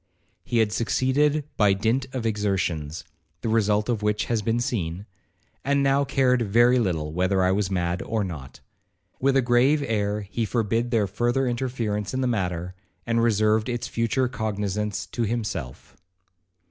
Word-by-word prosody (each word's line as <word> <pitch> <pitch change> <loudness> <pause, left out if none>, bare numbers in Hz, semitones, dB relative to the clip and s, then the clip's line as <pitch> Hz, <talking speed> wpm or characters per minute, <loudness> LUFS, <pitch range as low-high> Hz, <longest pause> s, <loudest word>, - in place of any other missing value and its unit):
He 120 -1 -2
had 110 -2 +3
succeeded 140 +6 +1
by 105 -2 +4
dint 115 +7 0
of 130 -3 -4
exertions, 95 -7 -1 0.4
(the 115 - -2
result 105 -1 +2
of 115 -4 -1
which 105 0 0
has 115 -2 0
been 115 +3 0
seen), 95 -6 -2 0.6
and 140 0 +2
now 140 +1 +3
cared 130 -2 +2
very 120 +4 +4
little 80 -8 -1
whether 95 +2 +1
I 90 - +3
was 100 0 0
mad 90 -1 -1
or 110 -2 -1
not. 75 -8 -8 0.6
With 135 +1 +3
a 135 - +3
grave 130 +5 +3
air 105 -2 -1
he 105 +3 -3
forbid 115 +1 0
their 115 -4 +2
further 120 +7 0
interference 120 -4 -2
in 130 - 0
the - - +1
matter, 90 -6 -2 0.3
and 115 0 +1
reserved 110 0 +2
its 120 -1 -3
future 115 +3 0
cognizance 105 -3 -2
to 120 - -5
himself. 105 - -4
110 Hz, 160 wpm, -25 LUFS, 100-120 Hz, 0.6 s, by